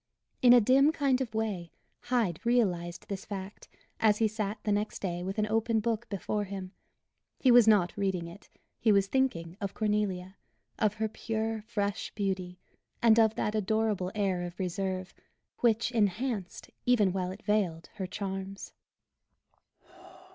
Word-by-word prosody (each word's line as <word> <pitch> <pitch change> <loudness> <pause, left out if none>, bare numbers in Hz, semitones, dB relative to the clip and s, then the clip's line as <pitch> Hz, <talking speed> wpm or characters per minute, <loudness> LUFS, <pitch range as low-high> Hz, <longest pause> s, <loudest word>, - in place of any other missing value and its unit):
In 245 - +7
a 245 - +9
dim 265 +6 +5
kind 275 -4 +1
of 230 -4 -4
way 200 -6 -2 0.3
Hyde 235 -9 0
realized 185 -9 0
this 195 -3 -5
fact 195 0 -7 0.3
as 215 -2 +4
he 225 - +3
sat 215 -1 -3
the 210 - 0
next 210 +1 -1
day 175 -2 -3
with 190 +3 -4
an 215 - +2
open 225 +1 +1
book 230 +1 -2
before 205 +1 -2
him. 190 -1 -6 0.7
He 260 - +5
was 240 -2 +7
not 200 -5 +4
reading 190 -4 -1
it; 175 +5 -13 0.3
he 225 - +3
was 200 -1 +4
thinking 195 -8 -1
of 200 -1 -4
Cornelia 200 -3 -1 0.4
of 215 -1 +2
her 220 0 -1
pure, 220 0 -3
fresh 205 -2 -2
beauty; 190 -3 -2 0.4
and 230 -1 +5
of 220 -1 +4
that 210 - -1
adorable 215 -3 0
air 195 -4 0
of 175 0 -6
reserve, 185 0 -3 0.5
which 235 0 +2
enhanced, 215 -2 -1 0.2
even 210 -7 +4
while 185 -1 -1
it 190 +4 -9
veiled 190 -6 0
her 190 -2 -3
charms. 195 0 -5
205 Hz, 155 wpm, -30 LUFS, 190-225 Hz, 0.7 s, a